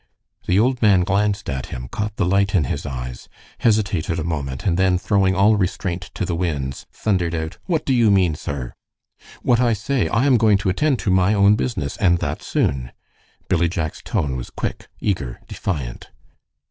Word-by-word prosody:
The 90 - +3
old 125 +4 +2
man 100 -5 +5
glanced 100 +1 0
at 65 -1 -3
him, 60 0 -6
caught 105 +8 -4
the - - 0
light 100 +2 +2
in 85 - +4
his 70 +2 -3
eyes, 65 -2 -6 0.3
hesitated 100 -7 +1
a 80 - -2
moment, 70 -5 -4
and 90 -4 +2
then, 95 0 +3
throwing 95 +1 +2
all 105 +3 +4
restraint 90 -1 -2
to - - -1
the 90 - -2
winds, 75 -6 -3
thundered 90 -5 0
out, 80 0 -4
"What 165 -4 -1
do 135 - +2
you 120 -3 +4
mean, 95 -5 +3
sir?" 70 -4 -5 0.7
"What 120 -1 +3
I 120 -2 +3
say. 110 -1 0
I 115 - +1
am 135 -3 +5
going 110 -3 +4
to 100 0 -1
attend 135 +9 +1
to 95 - +2
my 95 +3 +3
own 100 +1 +5
business, 110 - -3
and 85 -3 +3
that - - -3
soon." 65 -2 -1 0.5
Billy 85 0 +2
Jack's 80 -4 -3
tone 70 -3 -1
was - - -5
quick, - - -5
eager, 70 - -2
defiant. 70 -10 -4
95 Hz, 185 wpm, -21 LUFS, 80-105 Hz, 0.7 s, man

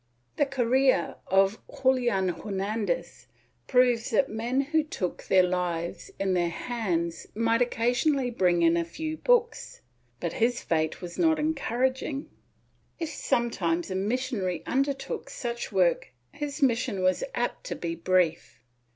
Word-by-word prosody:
^ - - -40
The 290 - +3
career 260 -5 +2
of 195 +2 +3 0.2
Julian 240 -8 +3
Hernandez 195 -2 -3 0.4
proves 250 -3 +3
that 265 +4 +2
men 235 +5 0
who 310 +3 +1
took 190 - -4
their 185 -1 +5
lives 180 -2 -2
in 195 -1 0
their 175 -1 +1
hands 170 -5 -2
might 230 +2 +2
occasionally 245 +3 +1
bring 180 -6 +2
in 165 0 +5
a 170 - +1
few 310 - -5
books, 480 +2 +1 0.4
but 170 - -3
his 235 +1 +1
fate 160 +1 -1
was 175 -1 -7
not 320 -2 +4
encouraging. 275 -2 -1 0.7
If 330 -3 -3
some 235 -5 0
times 170 -2 -1
a - - -2
missionary 200 -5 -1
undertook 275 +1 -1
such 235 -2 -4
work 185 -4 +2 0.2
his 290 0 -4
mission 230 -7 +1
was 185 - +2
apt - - -2
to - - -3
be 170 -1 -3
brief. 170 -1 0
230 Hz, 140 wpm, -27 LUFS, 180-260 Hz, 0.7 s, their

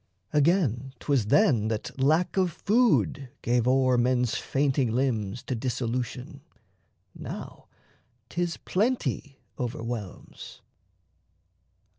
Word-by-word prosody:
Again, 140 - +2
'twas 135 -8 0
then 120 - +4
that 110 +4 -4
lack 155 +6 +2
of 185 -2 +2
food 205 - +2
gave 120 0 +1
o'er 130 -1 +3
Men's 125 -1 +2
fainting 135 -2 0
limbs 120 -3 -1
to - - -3
dissolution: 125 +3 -3 0.7
now - - -8 0.6
'Tis 170 +5 -2
plenty 180 - -1 0.2
overwhelms. 115 -4 -6
130 Hz, 90 wpm, -27 LUFS, 120-150 Hz, 0.7 s, then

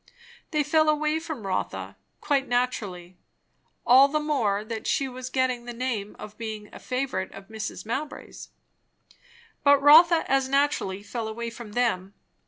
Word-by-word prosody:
They 305 -2 +1
fell 310 +1 +3
away 305 +1 +1
from 315 -10 -7
Rotha, 190 - -3 0.3
quite 275 -2 +1
naturally; 200 -8 -2 0.7
all 260 +3 +7
the 305 +2 0
more 225 -9 0
that 220 -1 -5
she 275 - +1
was 255 0 -7
getting 255 -2 0
the 240 -1 -7
name 230 -5 -3
of 210 +1 -11
being 215 -2 -6
a - - -9
favourite 250 -7 -3
of 195 +1 -12
Mrs. 220 -1 -6
Mowbray's. 270 +7 -6 1.1
But 285 -1 +6
Rotha 320 +4 +7
as 270 -1 +1
naturally 275 -9 0
fell 225 +2 -4
away 230 +1 -5
from 230 -3 -10
them. 205 -5 -1
250 Hz, 150 wpm, -26 LUFS, 215-285 Hz, 1.1 s, all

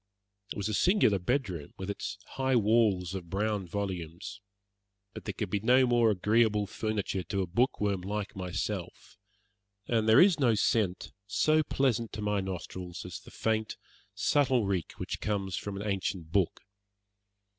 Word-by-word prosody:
It - - -4
was 100 0 -1
a 110 - -2
singular 175 - +3
bedroom, 90 - -2
with 95 +1 -3
its - - -5
high 130 -1 0
walls 105 -5 +3
of 90 -3 -6
brown 100 0 -1
volumes, 90 -2 -5 0.7
but - - -9
there - - -3
could - - -4
be 105 - +1
no 125 +5 +5
more 120 -2 +4
agreeable 105 +1 +2
furniture 105 -2 -2
to 95 +3 -2
a - - -2
bookworm 100 0 0
like 105 +2 -4
myself, 95 0 -4 0.7
and 110 -2 +1
there 110 - +8
is 180 -3 +6
no 120 -5 +4
scent 100 -3 +1 0.2
so 155 +10 +3
pleasant 125 -6 0
to 105 - -5
my 105 -1 +1
nostrils 90 -1 -6
as 90 -2 -6
that - - -15
faint, 110 -1 -1 0.4
subtle 130 -6 +2
reek 95 -4 -2
which - - -5
comes 100 -3 -1
from 100 -1 -4
an 105 - -5
ancient 95 -4 -2
book. 95 -2 +1
105 Hz, 155 wpm, -30 LUFS, 95-115 Hz, 0.7 s, there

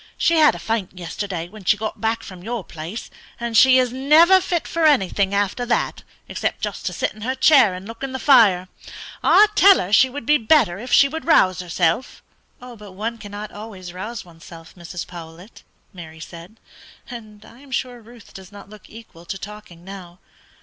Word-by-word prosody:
She 335 - +2
had 305 -1 +5
a - - -6
faint 215 -5 -4
yesterday 175 0 -5
when 210 +2 -14
she 205 +4 +2
got 220 0 -6
back 225 0 -1
from 185 -2 -11
your 230 -1 -4
place, 165 +7 -8 0.3
and 235 -1 -4
she 260 +3 +6
is 250 -1 +1
never 320 +8 +5
fit 350 -2 -2
for 335 - -2
anything 200 -8 +1
after 200 +4 -1
that 235 - -1 0.3
except - - -3
just - - -4
to - - -3
sit - - -2
in 215 - -15
her 255 +4 -2
chair 260 -8 +4
and 185 +2 -10
look 230 0 -11
in 270 -1 -4
the 260 - -4
fire. 210 -10 +4 0.6
I 420 - +6
tell 395 -1 +6
her 185 +3 -4
she 260 +4 +5
would 270 -1 -8
be 300 +3 +3
better 220 - +2
if 245 +3 -8
she 280 - +6
would 320 +3 -7
rouse 185 - +3
herself." 175 +5 -2 0.4
"But 225 -6 -12
one 225 +4 -5
cannot 205 0 -8
always 195 -4 -10
rouse 215 +5 -7
oneself, 165 -1 -15
Mrs. 175 0 -8
Powlett," 170 +3 -12 0.3
Mary 160 -3 -11
said; 170 +6 -12 0.5
"and 215 -4 -11
I 235 - -17
am 280 0 -17
sure 250 -1 -4
Ruth 230 -1 -17
does 190 0 -12
not 205 0 -14
look 215 - -15
equal 220 -7 -15
to 195 - -6
talking 195 -4 -12
now. 185 -3 -11
215 Hz, 195 wpm, -21 LUFS, 185-250 Hz, 0.6 s, she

